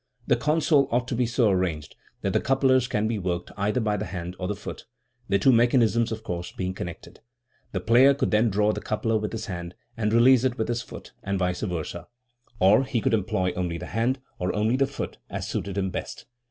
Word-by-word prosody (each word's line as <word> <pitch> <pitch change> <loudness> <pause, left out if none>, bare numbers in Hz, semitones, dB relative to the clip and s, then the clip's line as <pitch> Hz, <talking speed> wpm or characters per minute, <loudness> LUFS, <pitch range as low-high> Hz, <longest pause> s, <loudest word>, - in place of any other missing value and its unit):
The - - +3
console 150 -2 +2
ought 120 +1 +1
to 125 - -1
be 120 0 +1
so 120 -2 +2
arranged 85 -5 -1 0.3
that - - -1
the - - +2
couplers 130 -1 +3
can 110 -4 0
be 110 -2 -1
worked 90 -1 -3
either 105 +4 0
by 105 -3 0
the 105 - -3
hand 90 -1 -6
or 90 - -2
the 105 - -2
foot, 100 - -8 0.4
the 100 - +4
two 115 +7 +4
mechanisms, 120 -1 +3
of 110 0 -5
course, 90 -4 -4
being 95 0 -3
connected. 85 -2 -8 0.5
The 95 - -2
player 125 +7 +5
could 135 -1 -1
then 110 +2 +3
draw 105 +1 +2
the - - -5
coupler 110 +1 0
with 105 0 -3
his 115 - -4
hand 85 -2 -6 0.2
and 105 -2 0
release 120 +2 +6
it 130 -2 0
with 110 - -2
his 120 0 -1
foot, - - -11
and 100 0 -2
vice 90 -1 -1
versd, 90 -6 -4 0.5
or 100 +7 +5
he 130 -2 -1
could 130 +1 0
employ 105 -3 0
only 90 -2 -3
the 90 - -7
hand 120 +6 0 0.2
or 90 0 0
only 110 +3 +2
the 135 +1 +2
foot, - - -6
as - - -4
suited 100 -1 -3
him 95 -1 0
best. - - -6
110 Hz, 220 wpm, -25 LUFS, 95-120 Hz, 0.5 s, release